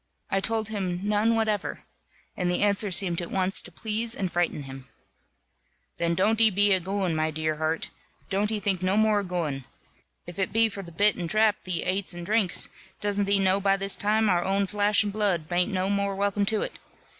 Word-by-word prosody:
I 195 - +2
told 220 +1 -1
him, 185 -4 -3
"None 210 +2 +2
whatever;" 215 -2 -1 0.5
and 180 -1 -1
the 180 - +1
answer 205 0 +1
seemed 175 -2 +1
at 170 - -6
once 190 0 +2
to 175 - -12
please 220 +5 -3
and 190 -3 -3
frighten 175 -4 -1
him. 135 -1 -10 1.1
"Then 170 0 0
don't 215 +5 +2
e 225 - +7
be 205 0 +3
a 190 - +3
gooin', 190 -1 -2
my 155 0 0
dear 155 0 -2
heart, 160 +1 -2 0.4
don't 205 +2 0
e 215 - -1
think 195 -2 0
no 185 +2 +1
more 215 -1 +3
of 200 - -5
gooin. 155 -7 -3 0.6
If 175 +2 -9
it 190 - 0
be 225 0 +4
for 200 -1 -7
the 175 -3 -10
bit 205 +5 +3
and 175 -2 -4
drap 215 +2 +2
thee 180 -2 -1
ates 185 0 0
and 175 0 -7
drinks, 210 -2 +1 0.3
doesn't 205 0 0
thee 200 0 +3
know 195 0 +2
by 195 0 +2
this 195 0 +1
time, 215 +1 +1
our 175 -3 +2
own 195 +1 +1
flash 205 +2 +2
and 205 -1 -4
blood 195 -7 0
bain't 180 +5 0
no 185 -1 -1
more 200 0 -1
welcome 200 0 0
to 215 0 +1
it! - - -7
195 Hz, 215 wpm, -26 LUFS, 175-210 Hz, 1.1 s, e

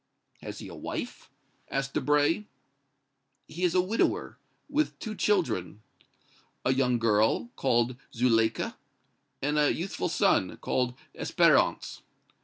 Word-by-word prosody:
"Has - - -7
he - - -8
a - - -9
wife?" - - -6 0.4
asked 135 0 -2
Debray. 150 +7 +2 1.0
"He 175 +3 -6
is 180 -1 +2
a 180 - +5
widower, 200 +5 -1 0.3
with 300 +1 0
two 220 - -5
children, 110 - 0 0.8
a 130 - +4
young 125 -2 +2
girl, 115 +1 +2
called 120 -1 +1
Zuleika, 115 -2 +1 0.7
and 150 +2 +1
a 150 - +4
youthful 180 +1 -3
son, 170 - +2
called 125 -1 -1 0.2
Espérance. - - +2
135 Hz, 115 wpm, -28 LUFS, 120-180 Hz, 1.0 s, a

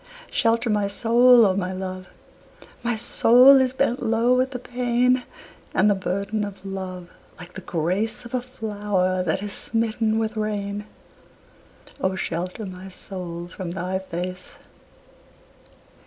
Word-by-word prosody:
Shelter 230 +1 +1
my 210 -2 +1
soul, 235 +3 +5
O 190 -2 +2
my 185 -1 -2
love! 185 0 -6 0.7
My 240 -1 0
soul 250 +4 +6
is 255 -1 +1
bent 255 -1 0
low 230 +1 +2
with 255 +1 +2
the 260 - -5
pain 250 0 +1 0.5
And 210 - +4
the - - +5
burden 200 +2 -2
of 200 -1 -7
love, 185 -2 -6 0.3
like 180 +1 -11
the 190 - -7
grace 185 +8 -2
Of 235 - -11
a 255 - 0
flower 205 -6 -1
that 185 +2 -1
is 205 -1 -5
smitten 225 -1 0
with 225 0 -1
rain: 210 -1 -3 1.1
O 190 -4 0
shelter 180 +3 -4
my 185 0 -8
soul 180 -2 -7
from 175 0 -7
thy 185 +2 -3
face! 180 0 -6
205 Hz, 140 wpm, -23 LUFS, 185-235 Hz, 1.1 s, soul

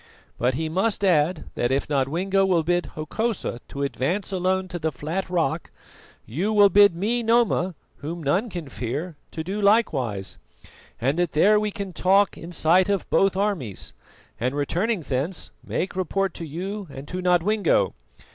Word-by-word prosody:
But 125 +1 +1
he 160 +3 -1
must 195 +6 0
add 165 -1 +2
that 120 - 0
if 135 +1 0
Nodwengo 165 +8 +1
will 180 -4 +2
bid 175 +2 +1
Hokosa 170 - -2
to 140 - -4
advance 170 +9 -1
alone 190 0 0
to 175 0 -5
the 160 0 -1
flat 165 +7 -4
rock, 170 -2 0 0.6
you 170 - -1
will 205 -2 +6
bid 205 -3 +6
me, 220 +7 0
Noma, 225 -6 +2 0.2
whom 165 +3 -6
none 190 - +1
can 175 -6 -6
fear, 140 +7 -4
to 160 - -5
do 195 +5 -3
likewise, 130 - +1 0.6
and 135 +7 0
that 175 -2 0
there 210 +7 +5
we 210 0 0
can 200 -3 -6
talk 195 +4 +3
in 165 +2 -9
sight 175 +3 +3
of 200 -2 0
both 195 -1 +3
armies, 195 - -2 0.5
and 125 +4 -1
returning 175 +8 0
thence, 145 +5 -3
make 185 - -3
report 190 0 0
to 165 - -6
you 190 +6 -5
and 140 +1 -9
to 185 +3 -4
Nodwengo. 180 +2 +2
175 Hz, 165 wpm, -24 LUFS, 150-195 Hz, 0.6 s, will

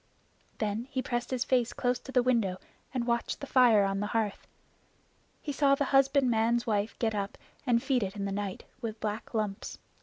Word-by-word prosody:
Then 215 +2 -2
he 260 -1 -3
pressed 240 -1 -2
his 255 -2 0
face 245 -3 +1
close 250 0 0
to 265 - -10
the 250 -2 +3
window 230 -7 +1 0.3
and 250 -2 -1
watched 235 -1 -1
the - - -5
fire 245 -6 +5
on 195 0 -1
the 205 - -1
hearth. 210 -3 -2 1.0
He 295 - -2
saw 275 0 +4
the 285 - 0
husbandman's 245 -4 +3
wife 210 -1 -1
get 225 -2 0
up 200 -1 -3 0.3
and 235 -1 +3
feed 260 -3 +2
it 195 0 -3
in 200 -1 -3
the 200 - -2
night 200 -1 -3 0.2
with 220 -2 -4
black 215 +2 -4
lumps. 210 -2 -2
235 Hz, 190 wpm, -30 LUFS, 210-255 Hz, 1.0 s, fire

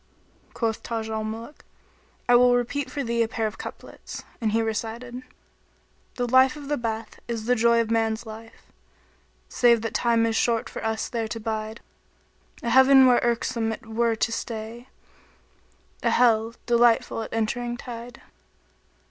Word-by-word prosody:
Quoth 225 -2 -1
Taj 225 -1 -4
al 220 0 -2
Muluk, 225 +6 -7 0.6
"I 245 - +6
will 245 0 +6
repeat 250 +3 -1
for 285 - -3
thee 235 -1 0
a 230 - +2
pair 225 0 -2
of 215 - -4
couplets;" - - -9 0.2
and 220 -2 +1
he 225 - +2
recited, 230 +3 -4 0.9
The 245 -1 -1
life 260 +3 +5
of 290 -2 -9
the 295 - +1
bath 225 -2 -4
is 230 -2 -4
the 250 - +3
joy 235 0 +4
of 230 -1 0
man's 225 0 0
life,[FN#22] 225 +1 -9 0.6
* - - -38
Save 235 -2 +5
that 225 - -3
time 230 -1 +2
is 225 -1 0
short 230 0 +1
for - - -7
us 220 0 -1
there 230 -3 -3
to 225 +1 -5
bide: 220 0 -4 0.8
A 235 - -1
Heaven 265 0 +7
where 250 -1 +5
irksome 230 -1 0
it 220 - -7
were 225 +1 0
to 225 - 0
stay; 230 +2 -5 0.6
* - - -36
A - - +2
Hell, 230 -1 +3
delightful 235 -1 +3
at 220 - -7
entering 240 +2 -2
tide." 240 0 -9
230 Hz, 165 wpm, -25 LUFS, 225-240 Hz, 0.9 s, Heaven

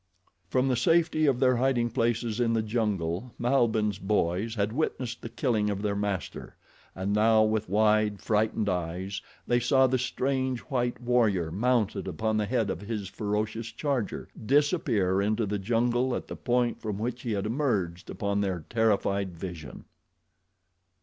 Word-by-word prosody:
From 130 +4 +2
the 130 - +2
safety 160 +3 +3
of 130 -3 +2
their 130 -2 +4
hiding 120 -2 +1
places 115 -1 0
in 115 -1 +2
the 110 -1 +1
jungle 105 -2 -2
Malbihn's 110 -5 +1
boys 100 +2 0
had 105 0 0
witnessed 125 -4 -2
the 115 - -6
killing 110 -5 0
of 100 0 -3
their 105 -1 0
master, 100 -2 -4 0.4
and 95 +2 -2
now, 110 +1 +5
with 110 -3 0
wide, 105 0 +3
frightened 110 0 0
eyes, 90 +2 -2 0.2
they 120 - +2
saw 130 +2 +4
the 130 0 +1
strange 130 0 -1
white 120 -4 -2
warrior, 110 -9 +1
mounted 110 0 0
upon 110 -1 -1
the 105 -1 0
head 115 -3 0
of 85 - -5
his 105 -2 -4
ferocious 105 +3 -2
charger, 135 -2 -2 0.2
disappear 115 - +2
into 110 +2 +1
the 105 0 -2
jungle 120 +4 +1
at - - -4
the - - -6
point 120 -1 0
from 105 -3 -3
which 120 +3 -3
he 115 - -2
had 100 -1 -2
emerged 105 - -1
upon 100 0 -1
their 95 -5 -2
terrified 100 -5 +1
vision. 80 -6 -8
110 Hz, 155 wpm, -28 LUFS, 100-120 Hz, 0.4 s, now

